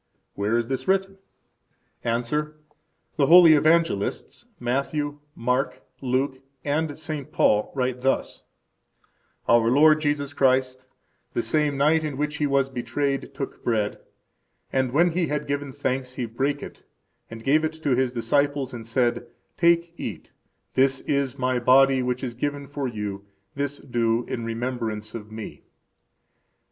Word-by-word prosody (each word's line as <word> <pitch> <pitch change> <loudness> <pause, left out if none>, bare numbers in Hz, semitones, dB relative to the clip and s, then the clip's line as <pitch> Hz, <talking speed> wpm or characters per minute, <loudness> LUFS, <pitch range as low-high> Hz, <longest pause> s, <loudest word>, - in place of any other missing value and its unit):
Where 105 +3 0
is 120 - 0
this 130 +2 -4
written? 195 0 +1 0.8
–Answer: 150 +7 -1 0.6
The 140 -3 +3
holy 170 -1 +9
Evangelists, 155 -8 +1
Matthew, 145 +4 -2 0.2
Mark, 125 +3 -1 0.2
Luke, 130 +1 0 0.3
and 145 0 -1
St. 155 -3 -5
Paul, 105 0 +2
write 125 -1 -1
thus: 135 +1 0 1.1
Our 115 -1 +5
Lord 155 +4 +5
Jesus 145 -2 -1
Christ, 130 -1 +1 0.5
the 120 - +1
same 150 -2 +1
night 155 +3 +3
in 150 -3 -3
which 150 +1 -2
He 150 - +1
was 140 -1 +2
betrayed, 135 +2 -2
took 135 - -6
bread: 110 -3 0 0.7
and 130 -2 +1
when 170 +6 +4
He 170 0 0
had 150 0 -2
given 145 -1 -3
thanks, 130 -1 -2
He 125 -1 -3
brake 135 +5 -2
it, - - -10 0.5
and 115 0 -9
gave 150 +5 +3
it 155 0 -1
to 140 - +1
His 130 0 +1
disciples, 140 +3 0
and 115 -2 -8
said, 120 0 0 0.3
Take, 170 0 +3
eat; 90 -9 -6 0.4
this 135 0 +3
is 140 -2 -1
My 130 -1 0
body, 135 +2 +5
which 125 0 -2
is 125 -2 -3
given 145 +3 -3
for 140 -1 -4
you. 105 -4 -5 0.3
This 140 0 -2
do 120 -2 0
in 115 -2 -4
remembrance 115 -2 -3
of 110 -2 -8
Me. 110 0 -8
135 Hz, 145 wpm, -25 LUFS, 120-145 Hz, 1.1 s, holy